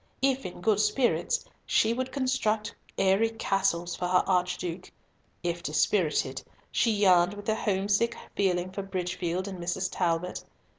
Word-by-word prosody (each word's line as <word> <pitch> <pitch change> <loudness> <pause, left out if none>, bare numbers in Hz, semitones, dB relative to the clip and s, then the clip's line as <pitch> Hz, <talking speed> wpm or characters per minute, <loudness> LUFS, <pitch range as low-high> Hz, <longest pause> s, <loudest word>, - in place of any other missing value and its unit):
If 270 -3 +2
in 175 - -10
good 210 +2 +2
spirits 240 +3 +1 0.2
she 225 +1 +2
would 255 +2 -3
construct 255 -6 0 0.2
airy 195 +4 +3
castles 195 -6 0
for 180 - -2
her 180 0 +3
Archduke; 180 -1 -1 0.5
if 175 0 -2
dispirited, 150 -3 +1 0.3
she 230 - +2
yearned 190 -3 +4
with 205 0 -9
a 220 - +3
homesick 205 +2 +1 0.2
feeling 185 -2 +1
for 200 - -4
Bridgefield 185 -1 -3
and 190 -2 -6
Mrs. 180 +2 -2
Talbot. 175 0 -1
190 Hz, 140 wpm, -28 LUFS, 175-215 Hz, 0.5 s, yearned